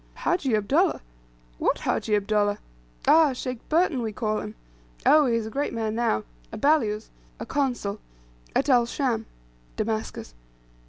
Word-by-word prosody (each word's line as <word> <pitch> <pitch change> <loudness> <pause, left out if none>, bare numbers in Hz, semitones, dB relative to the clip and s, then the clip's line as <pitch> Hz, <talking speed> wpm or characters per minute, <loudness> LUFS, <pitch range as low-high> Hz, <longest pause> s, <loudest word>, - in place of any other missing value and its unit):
"Hajji 275 -10 0
Abdullah! 290 - +2 0.6
What - - +1
Hajji 210 - 0
Abdullah? 205 0 +1 0.5
Ah! 315 -4 +6
Sheikh 255 -1 -4
Burton 320 -5 +2
we 225 -2 -2
call 215 0 -1
him. 105 - -7 0.5
Oh, 300 -2 +6
he 235 - +2
is 230 -1 -1
a 220 - -6
great 280 -1 -2
man 220 -1 -1
now; 220 - 0 0.3
a - - -6
balyuz 225 -8 +1 0.3
(a - - -5
consul) 245 -8 -1 0.6
at 275 - +2
El 245 -4 +4
Scham" 235 -4 -1 0.5
(Damascus.) 215 - -3
230 Hz, 145 wpm, -25 LUFS, 215-280 Hz, 0.6 s, Ah